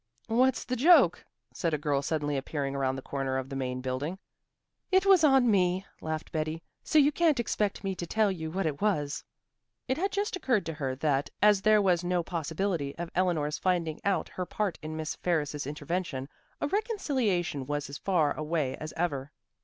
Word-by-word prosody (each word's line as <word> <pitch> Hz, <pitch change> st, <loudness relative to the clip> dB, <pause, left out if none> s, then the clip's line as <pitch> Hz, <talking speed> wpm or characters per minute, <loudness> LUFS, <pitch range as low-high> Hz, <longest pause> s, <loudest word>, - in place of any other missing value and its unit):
"What's 250 Hz, +3 st, +2 dB
the 255 Hz, -, -2 dB
joke?" 330 Hz, +8 st, +5 dB, 0.3 s
said 165 Hz, -3 st, 0 dB
a -, -, -1 dB
girl 145 Hz, -1 st, 0 dB
suddenly 145 Hz, 0 st, -1 dB
appearing 140 Hz, 0 st, -2 dB
around 135 Hz, -1 st, 0 dB
the 135 Hz, -, -7 dB
corner 135 Hz, -1 st, -2 dB
of 130 Hz, 0 st, -4 dB
the 135 Hz, -, -5 dB
Main 130 Hz, -1 st, -3 dB
Building. 130 Hz, +7 st, -3 dB, 0.7 s
"It 375 Hz, +1 st, +4 dB
was 385 Hz, -4 st, +6 dB
on 270 Hz, -5 st, +5 dB
me," 185 Hz, -1 st, +2 dB, 0.2 s
laughed 160 Hz, 0 st, -4 dB
Betty, 155 Hz, +1 st, -2 dB, 0.2 s
"so 315 Hz, -, +1 dB
you 290 Hz, 0 st, +6 dB
can't 310 Hz, -4 st, +2 dB
expect 210 Hz, -3 st, -1 dB
me 195 Hz, -1 st, -1 dB
to 175 Hz, -2 st, -6 dB
tell 215 Hz, +2 st, +2 dB
you 160 Hz, -4 st, -4 dB
what 190 Hz, +3 st, -2 dB
it 150 Hz, -3 st, -2 dB
was." 150 Hz, -9 st, 0 dB, 0.6 s
It 260 Hz, -, 0 dB
had 390 Hz, +4 st, 0 dB
just 405 Hz, 0 st, -1 dB
occurred 255 Hz, -, +1 dB
to 165 Hz, -, -3 dB
her 135 Hz, -4 st, -3 dB
that, 140 Hz, 0 st, 0 dB
as 210 Hz, -2 st, +5 dB
there 215 Hz, 0 st, +5 dB
was 180 Hz, -3 st, +2 dB
no 175 Hz, -1 st, 0 dB
possibility 165 Hz, -2 st, -2 dB
of 170 Hz, 0 st, -5 dB
Eleanor's 165 Hz, -5 st, 0 dB
finding 170 Hz, -4 st, 0 dB
out 195 Hz, -5 st, +1 dB
her 180 Hz, -, -4 dB
part 210 Hz, -4 st, -2 dB
in 155 Hz, 0 st, -5 dB
Miss 160 Hz, 0 st, -3 dB
Ferris's 150 Hz, -5 st, -1 dB
intervention, 150 Hz, -2 st, -3 dB, 0.3 s
a -, -, 0 dB
reconciliation 260 Hz, -, -1 dB
was 145 Hz, 0 st, -2 dB
as 140 Hz, +2 st, -8 dB
far 165 Hz, -7 st, +2 dB
away 155 Hz, -4 st, -1 dB
as 155 Hz, 0 st, -7 dB
ever. 145 Hz, -5 st, -1 dB
170 Hz, 190 wpm, -29 LUFS, 145-210 Hz, 0.7 s, was